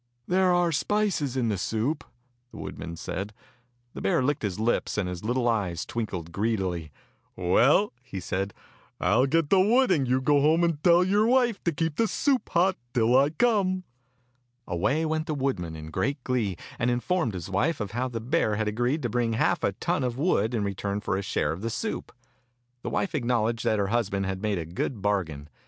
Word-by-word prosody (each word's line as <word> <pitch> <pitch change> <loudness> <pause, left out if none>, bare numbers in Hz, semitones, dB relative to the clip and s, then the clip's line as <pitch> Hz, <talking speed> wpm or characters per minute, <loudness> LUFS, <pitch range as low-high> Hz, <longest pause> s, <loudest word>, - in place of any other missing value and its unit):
"There 185 0 +3
are 175 -1 +3
spices 165 -5 0
in 120 -3 +1
the 100 -3 -1
soup," 125 - -1 0.5
the - - -12
wood - - -7
man 85 - -6
said. 100 +5 -5 0.6
The - - -7
bear 95 +6 +2
licked 145 +3 0
his 100 -2 -3
lips, 115 0 0
and 100 -3 0
his 90 0 -5
little 120 +2 0
eyes 100 -8 0
twinkled 95 -8 -4
greedily. 95 -6 -1 0.4
"Well," 125 - +3
he 125 -7 -7
said, 95 +2 -3 0.4
"I'll 125 +6 +3
get 160 +1 +1
the 195 - +6
wood, 240 +4 +4
and 140 -7 +2
you 130 +1 +2
go 145 +2 +3
home 160 +4 +4
and 165 -3 0
tell 175 0 +6
your 205 +4 +3
wife 245 -3 +2
to 170 - +3
keep 160 0 -2
the 225 - +3
soup 270 +3 0
hot 185 +2 +2 0.2
till 120 +1 +3
I 140 +2 +5
come." 185 0 +1 0.8
Away 135 - 0
went 155 0 -1
the 155 - -1
woodman 115 - -2
in 80 0 -8
great 140 - 0
glee, 115 -8 -1 0.2
and 120 - +2
informed 125 - 0
his 90 +1 -6
wife 140 - +1
of 105 -3 -4
how 120 +4 -1
the 120 -2 -4
bear 115 -2 +1
had 110 0 -1
agreed 120 +8 0
to 120 - 0
bring 115 0 0
half 110 - +1
a - - +1
ton - - -1
of 125 -1 -2
wood 125 - +1
in 110 - 0
return 100 0 -2
for 100 - -2
a 95 - -1
share - - -1
of 85 - -5
the 115 - -2
soup. 215 - -4 0.7
The - - -4
wife 195 - -1
acknowledged 120 -4 0
that 110 -2 +2
her 100 -1 0
husband 105 -4 0
had 95 0 -3
made 105 -2 0
a 85 - -3
good 95 +6 -4
bargain. 85 -8 -1
120 Hz, 205 wpm, -27 LUFS, 100-160 Hz, 0.8 s, the